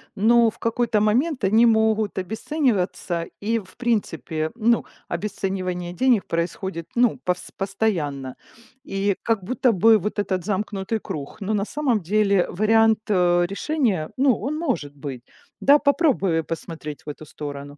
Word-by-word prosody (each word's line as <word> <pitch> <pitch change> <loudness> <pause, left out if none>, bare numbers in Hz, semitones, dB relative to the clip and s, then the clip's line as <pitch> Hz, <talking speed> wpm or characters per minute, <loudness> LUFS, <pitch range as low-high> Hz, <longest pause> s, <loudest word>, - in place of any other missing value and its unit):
но 230 +3 +4
в - - -12
какой-то 230 -1 0
момент 255 +6 +1
они 220 +5 +5
могут 220 -2 +2
обесцениваться. 190 - -1 0.2
И 225 +3 0
в 190 -3 -14
принципе, 165 -9 -2
ну, 235 0 +2 0.2
обесценивание 185 -2 -3
денег 235 +2 +2
происходит, 170 0 -3
ну, 245 0 +3
повс 180 0 -2
постоянно. 170 -10 -2 0.5
И 195 -5 0
как 225 -4 0
будто 250 +4 +1
бы 220 +4 +6
вот 210 +2 -4
этот 190 -3 -1
замкнутый 205 +1 -2
круг. 145 +7 -7
Но 200 +2 -1
на 200 -1 0
самом 260 -5 0
деле 200 +1 +2
вариант, 220 +2 +3
э, 175 -3 +3
решения, 200 - -1
ну, 265 -2 +4
он 285 +7 -3
может 245 - -2
быть, 135 -4 -7 0.4
да. 285 +2 +6
Попробуй 275 - +2
посмотреть 160 -2 -7
в - - -6
эту 150 +1 -8
сторону. 145 -1 -8
205 Hz, 140 wpm, -23 LUFS, 175-230 Hz, 0.5 s, бы